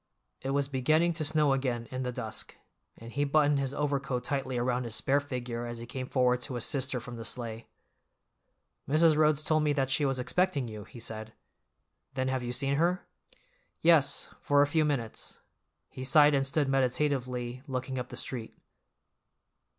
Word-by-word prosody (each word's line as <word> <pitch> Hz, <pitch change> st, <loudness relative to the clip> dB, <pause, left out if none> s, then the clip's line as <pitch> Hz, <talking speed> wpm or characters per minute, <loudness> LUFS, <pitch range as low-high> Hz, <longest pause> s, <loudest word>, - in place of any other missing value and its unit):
It 135 Hz, -, -4 dB
was 140 Hz, 0 st, +1 dB
beginning 155 Hz, +6 st, +2 dB
to 160 Hz, -1 st, -2 dB
snow 150 Hz, -2 st, +3 dB
again 125 Hz, -3 st, -1 dB
in 130 Hz, 0 st, -3 dB
the 125 Hz, -1 st, -2 dB
dusk, 120 Hz, -3 st, -4 dB, 0.4 s
and 115 Hz, +1 st, -10 dB
he 145 Hz, -, 0 dB
buttoned 145 Hz, 0 st, +3 dB
his 135 Hz, -1 st, -1 dB
overcoat 140 Hz, -3 st, -1 dB
tightly 130 Hz, -1 st, -2 dB
around 125 Hz, +1 st, 0 dB
his 115 Hz, -1 st, -1 dB
spare 140 Hz, +1 st, +2 dB
figure 125 Hz, -4 st, -4 dB
as 120 Hz, 0 st, -6 dB
he 115 Hz, -, -7 dB
came 130 Hz, +1 st, -5 dB
forward 125 Hz, -2 st, +2 dB
to 130 Hz, 0 st, -4 dB
assist 130 Hz, +3 st, 0 dB
her 125 Hz, -, -1 dB
from 120 Hz, 0 st, -8 dB
the 115 Hz, -, -6 dB
sleigh. 115 Hz, -1 st, -5 dB, 1.2 s
"Mrs. 155 Hz, +2 st, +5 dB
Rhodes 155 Hz, -1 st, +3 dB
told 155 Hz, 0 st, +2 dB
me 150 Hz, -1 st, +2 dB
that 135 Hz, -2 st, 0 dB
she 145 Hz, -, +2 dB
was 135 Hz, -2 st, +1 dB
expecting 145 Hz, +1 st, 0 dB
you," 105 Hz, -2 st, -8 dB
he 120 Hz, -, -12 dB
said. 110 Hz, -1 st, -4 dB, 0.8 s
"Then 130 Hz, 0 st, 0 dB
have 130 Hz, -1 st, -1 dB
you 120 Hz, 0 st, -3 dB
seen 135 Hz, +3 st, 0 dB
her?" 175 Hz, +4 st, +1 dB, 0.8 s
"Yes, 160 Hz, -4 st, +4 dB
for 145 Hz, 0 st, +4 dB
a -, -, +4 dB
few 155 Hz, +1 st, +2 dB
minutes." 125 Hz, -7 st, -3 dB, 0.5 s
He 130 Hz, -, -7 dB
sighed 150 Hz, +2 st, +6 dB
and 135 Hz, -1 st, +2 dB
stood 145 Hz, +1 st, +1 dB
meditatively 130 Hz, -2 st, 0 dB
looking 130 Hz, 0 st, -3 dB
up 125 Hz, -, -5 dB
the -, -, -7 dB
street. 120 Hz, -4 st, -4 dB
135 Hz, 180 wpm, -30 LUFS, 125-145 Hz, 1.2 s, sighed